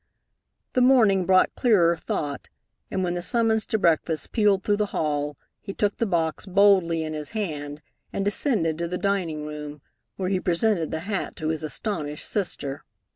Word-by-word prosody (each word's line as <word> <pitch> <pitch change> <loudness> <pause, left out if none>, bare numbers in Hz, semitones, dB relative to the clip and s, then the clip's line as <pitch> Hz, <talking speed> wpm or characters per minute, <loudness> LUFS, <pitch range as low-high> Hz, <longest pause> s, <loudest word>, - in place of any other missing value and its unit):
The 255 - +2
morning 220 -8 +4
brought 185 -1 +4
clearer 180 -9 +3
thought, 145 -3 -4 0.4
and 190 - -1
when 175 -1 -1
the 175 - -3
summons 220 +2 +1
to 220 - +1
breakfast 165 -3 +1
pealed 205 -4 +2
through 205 -1 +1
the 210 0 0
hall 145 -2 -1 0.2
he 195 - -8
took 205 -1 0
the 230 - 0
box 165 0 -1
boldly 185 -4 +4
in 155 0 -4
his 150 -1 -5
hand 150 -6 -4 0.3
and 195 - -2
descended 200 - +1
to 170 - -1
the 180 +2 -3
dining 180 -7 -1
room, 150 -1 -7 0.3
where 185 -1 -2
he 190 -1 +1
presented 175 -1 +1
the 160 - -3
hat 195 +2 -3
to 155 -2 -3
his 160 -1 -2
astonished 155 -2 -3
sister. 145 -8 -2
175 Hz, 175 wpm, -25 LUFS, 155-205 Hz, 0.4 s, morning